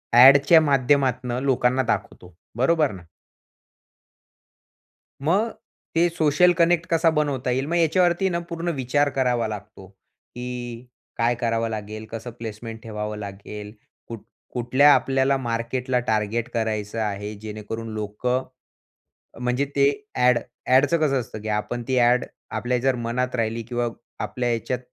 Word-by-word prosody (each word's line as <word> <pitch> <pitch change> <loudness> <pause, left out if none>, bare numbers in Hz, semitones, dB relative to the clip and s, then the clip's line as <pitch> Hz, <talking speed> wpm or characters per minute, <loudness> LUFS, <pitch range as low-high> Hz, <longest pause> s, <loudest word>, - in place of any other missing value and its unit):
ॲडच्या 140 +6 +8
माध्यमातनं 130 -3 +2
लोकांना 130 -1 +2
दाखवतो. 90 -6 -3 0.2
बरोबर 150 +1 +3
ना. 95 -2 -9 2.2
मग 205 +8 +2 0.4
ते 170 +1 +4
सोशल 160 +3 +4
कनेक्ट 170 -1 +2
कसा 165 0 +3
बनवता 140 -5 0
येईल. 130 +2 0
मग 170 - -1
याच्यावरती 175 +3 +3 0.2
पूर्ण 170 +1 -3
विचार 140 +3 +1
करावा 125 -4 0
लागतो, 105 -2 -8
की 120 +4 -9 0.3
काय 120 +1 +2
करावं 115 -1 -1
लागेल? 110 0 -6
कसं 115 +1 -6
प्लेसमेंट 110 0 -7
ठेवावं 105 -1 -5
लागेल? 105 +1 -8 0.3
कुठ 115 -3 -7 0.3
कुठल्या 130 +4 +5
आपल्याला 135 0 +2
मार्केटला 125 +1 -1
टार्गेट 110 +2 0
करायचं 110 -1 -2
आहे? 105 0 -3
जेणेकरून 110 +2 -6
लोकं, 110 +5 -2 1.0
म्हणजे 125 +3 0
ते 140 0 +5 0.3
ॲड 125 -1 +4 0.3
ॲडचं 140 +6 +4
कसं 135 -3 +2
असतं, 110 -2 -7
की 110 - -7
आपण 110 +3 -2
ती 130 - +1
ॲड 120 +1 +4 0.3
आपल्या 125 0 -1
जर 130 +1 +1
मनात 125 +2 -2
राहिली 115 -1 -1
किंवा 120 +1 -2 0.4
आपल्या 120 -1 -2
याच्यात 120 +2 -2
125 Hz, 130 wpm, -24 LUFS, 110-135 Hz, 2.2 s, ॲडच्या